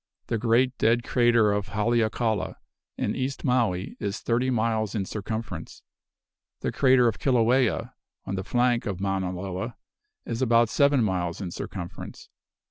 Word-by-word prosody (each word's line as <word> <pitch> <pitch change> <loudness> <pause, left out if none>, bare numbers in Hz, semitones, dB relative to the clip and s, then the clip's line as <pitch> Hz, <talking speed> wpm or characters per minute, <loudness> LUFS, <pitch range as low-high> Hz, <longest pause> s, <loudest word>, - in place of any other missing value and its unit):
The 115 - 0
great 120 +3 +2
dead 115 +1 +3
crater 120 -4 +3
of 100 -1 -1
Haleakala, 110 -1 0 0.4
in - - -1
East 130 +1 -3
Maui, 115 -8 0
is 100 0 -3
thirty 120 +3 0
miles 110 -3 0
in 100 -3 -1
circumference. 105 -4 -5 0.8
The - - -1
crater 130 -2 +4
of 115 - -1
Kilauea, 125 -1 +2 0.3
on - - -4
the 95 0 -2
flank 120 +3 +1
of 95 -3 -3
Mauna 95 -2 -1
Loa, 95 +5 -5 0.5
is 115 +1 -3
about 115 -2 +4
seven 140 -1 +3
miles 90 -4 -1
in 90 -4 -5
circumference. 85 0 -7
115 Hz, 140 wpm, -26 LUFS, 100-120 Hz, 0.8 s, crater